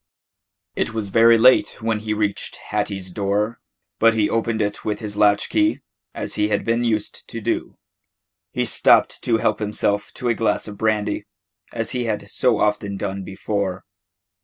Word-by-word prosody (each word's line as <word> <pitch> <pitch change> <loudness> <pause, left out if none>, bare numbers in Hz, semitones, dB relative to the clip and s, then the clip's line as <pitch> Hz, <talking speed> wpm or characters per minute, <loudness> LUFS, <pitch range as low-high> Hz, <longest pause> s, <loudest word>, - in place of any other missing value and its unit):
It 115 - -2
was 105 -3 -3
very 115 +3 +6
late 125 +3 +4
when 110 -2 -1
he 110 0 -4
reached 105 -2 -2
Hattie's 100 -3 -2
door, 105 +4 -1 0.4
but 115 0 +5
he 105 -2 +1
opened 115 0 0
it 105 -1 -2
with 105 - -1
his 105 -3 -6
latch 105 0 +3
key, 315 0 +1 0.3
as - - -4
he 105 0 +1
had 105 -1 -1
been 115 +1 +1
used 110 -3 -2
to - - -6
do. - - -2 0.8
He - - 0
stopped - - +3
to 115 - +2
help - - 0
himself 105 -1 -1
to 125 - -3
a 120 - +3
glass 110 -2 0
of 105 - -7
brandy, 105 -1 0 0.5
as 115 -1 -2
he 125 -2 -1
had 105 -2 -3
so 125 -4 +2
often 105 -1 0
done 95 -1 -4
before. 95 -1 -3
105 Hz, 170 wpm, -22 LUFS, 105-115 Hz, 0.8 s, very